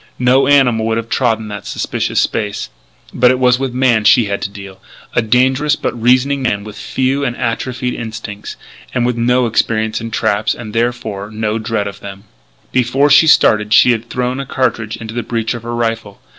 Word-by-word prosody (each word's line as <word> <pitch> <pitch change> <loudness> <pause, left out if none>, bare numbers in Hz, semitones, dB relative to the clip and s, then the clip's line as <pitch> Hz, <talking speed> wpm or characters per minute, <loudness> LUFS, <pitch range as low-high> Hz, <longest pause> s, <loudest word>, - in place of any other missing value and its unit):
No 130 +2 +3
animal 125 -6 +3
would 115 0 0
have 115 0 -4
trodden 110 -4 0
that 105 -1 -7
suspicious - - -2
space. 105 - -2 0.4
But 125 +1 +4
it 130 - +2
was 125 0 +3
with 135 -1 -2
man 125 -3 +2
she 115 +2 +5
had 100 -1 -3
to - - -3
deal 100 -1 -11 0.3
a - - +2
dangerous 130 +6 +2
but - - -3
reasoning 130 +4 +2
man 100 -5 -1
with 105 0 -10
few 130 +5 -1
and 125 -3 -2
atrophied 125 +1 -2
instincts 110 -2 -7 0.4
and 120 - +1
with 125 -1 0
no 125 +2 +2
experience 110 -1 0
in 115 - -5
traps; 110 -1 0
and, 110 -3 -9
therefore, 115 -4 -2
in 110 0 -11
no 110 0 -1
dread 110 -2 -2
of 100 - -8
them. 100 0 -10 0.5
Before 130 +3 +2
she 160 +3 +6
started 105 -8 +4
she 125 - +6
had 115 0 -3
thrown 125 +1 -2
a 140 - -4
cartridge 115 -5 -1
into 110 -1 -8
the 120 - -2
breech 115 0 -2
of 120 - -6
her 120 +1 -5
rifle. 115 -3 -3
115 Hz, 200 wpm, -16 LUFS, 110-125 Hz, 0.5 s, she